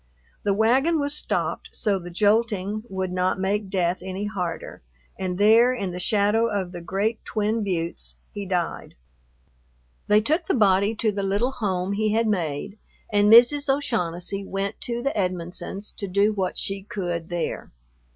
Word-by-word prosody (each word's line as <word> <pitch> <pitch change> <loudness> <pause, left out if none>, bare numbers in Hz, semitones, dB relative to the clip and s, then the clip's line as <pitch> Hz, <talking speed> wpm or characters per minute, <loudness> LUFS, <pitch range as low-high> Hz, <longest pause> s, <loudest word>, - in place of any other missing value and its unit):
The 200 -1 +1
wagon 265 +10 +3
was 285 0 -1
stopped - - -2
so 200 -3 0
the 175 0 -8
jolting 210 +1 +1
would 190 -1 -3
not 185 0 0
make 195 +1 -1
death 180 -1 0
any 190 +2 -4
harder, 180 -5 -4 0.3
and 185 -1 -3
there 225 +5 +6
in 195 -6 -3
the 180 - -5
shadow 210 +4 +2
of 195 -4 -2
the 175 -1 -7
great 200 +6 -1
twin 215 +1 -1
buttes 165 - -3 0.2
he 200 -1 -6
died. 180 -2 -2 1.1
They 210 +1 +5
took 310 - 0
the - - +2
body 200 -1 +3
to 215 0 +1
the 200 0 -3
little 200 +6 0
home 190 -6 -2
he 215 +1 +1
had 230 +1 +2
made, 195 0 -2 0.3
and 205 +1 +4
Mrs. 270 +5 +7
O'Shaughnessy 195 -8 -1
went 195 +1 -4
to 240 0 -3
the 275 - -1
Edmonsons' 185 +1 -3
to 200 - -3
do 200 +3 +2
what 190 -3 -2
she 195 0 -3
could 175 -6 -4
there. 175 -1 -3
200 Hz, 160 wpm, -24 LUFS, 185-220 Hz, 1.1 s, Mrs